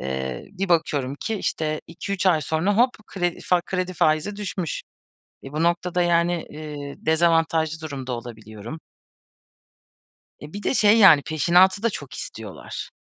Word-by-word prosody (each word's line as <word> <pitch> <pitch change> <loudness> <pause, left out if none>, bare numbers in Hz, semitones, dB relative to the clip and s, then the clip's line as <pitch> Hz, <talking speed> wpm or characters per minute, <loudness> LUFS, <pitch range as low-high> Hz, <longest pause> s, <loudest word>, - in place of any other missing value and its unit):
eee, 65 -1 -4
bir 195 0 -3
bakıyorum 145 -6 +1
ki 225 - -2
işte 155 -6 -2
2-3 190 +3 -4
ay 170 -4 +4
sonra 160 +7 0
hop 245 +3 +5 0.2
kredi 175 -3 -2
fa 180 -1 +2
kredi 185 +1 -3
faizi 155 +5 +1
düşmüş. 185 -5 -4 0.6
E, 135 - -9
bu 155 +2 -1
noktada 175 +1 +1
yani, 175 0 +2
eee, 150 -2 -7
dezavantajlı 160 0 +1
durumda 135 -4 -5
olabiliyorum. 115 +3 -8 1.6
E, 150 +4 -11
bir 205 - -6
de - - +1
şey, 215 -1 +5
yani, 170 -9 +8
peşinatı 180 +6 +3
da 230 - +3
çok 145 - -8
istiyorlar. 110 -4 -7
165 Hz, 140 wpm, -23 LUFS, 145-185 Hz, 1.6 s, yani